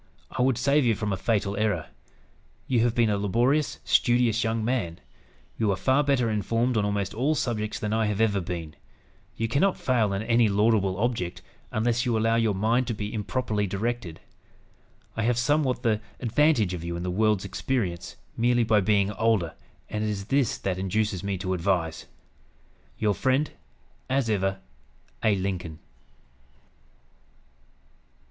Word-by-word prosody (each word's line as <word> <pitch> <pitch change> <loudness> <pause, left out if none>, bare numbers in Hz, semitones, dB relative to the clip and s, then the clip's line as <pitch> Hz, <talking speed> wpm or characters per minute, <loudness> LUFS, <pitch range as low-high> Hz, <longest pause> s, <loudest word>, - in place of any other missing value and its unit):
I 130 - -2
would 130 -2 +3
save 140 +1 +3
you 115 -3 +3
from 105 -1 -2
a - - +1
fatal 100 -1 0
error. 105 -6 0 0.8
You 125 -3 +1
have 120 0 +2
been 115 -3 +3
a 100 - 0
laborious, 120 +9 +1
studious 120 -2 +3
young 110 -1 -1
man. 110 -10 -1 0.6
You 110 -2 +2
are - - +1
far 130 +8 +2
better 135 -4 +2
informed 115 +3 0
on 105 - +2
almost 100 -1 -1
all 135 +8 +1
subjects 110 -6 -2
than 105 0 -2
I 110 -1 +1
have 105 -1 -2
ever 105 -3 +2
been. 85 -3 -5 0.6
You 115 - -1
cannot 155 - +2
fail 120 -7 +1
in 100 +2 -2
any 115 -1 +3
laudable 100 -2 +2
object, 110 -6 -2 0.3
unless 120 +2 +1
you 120 -4 +1
allow 115 +1 +2
your 115 -3 +2
mind 115 +5 +1
to 115 - -2
be 105 0 -5
improperly 105 -1 -1
directed. 100 -3 -3 1.0
I 115 - -1
have 115 +1 +1
somewhat 130 0 +1
the 110 -3 +1 0.2
advantage 120 - +2
of 85 -2 -5
you 85 0 -4
in 85 - -4
the 90 - -2
world's 105 0 +1
experience, 100 -10 -2 0.2
merely 120 +1 +2
by 110 -2 +3
being 100 0 +2
older; 105 -6 +1 0.3
and 105 0 -3
it 110 - 0
is 100 -2 -3
this 135 -1 +1
that 95 -1 -2
induces 95 0 -1
me 100 -1 -2
to 95 0 -2
advise. 85 -3 -1 0.9
"Your 105 -2 +1
friend, 135 +6 +1 0.6
as 130 -3 +1
ever, 95 -1 0 0.6
"A. 110 -2 +4
LINCOLN." 90 -4 -3
110 Hz, 160 wpm, -26 LUFS, 100-120 Hz, 1.0 s, A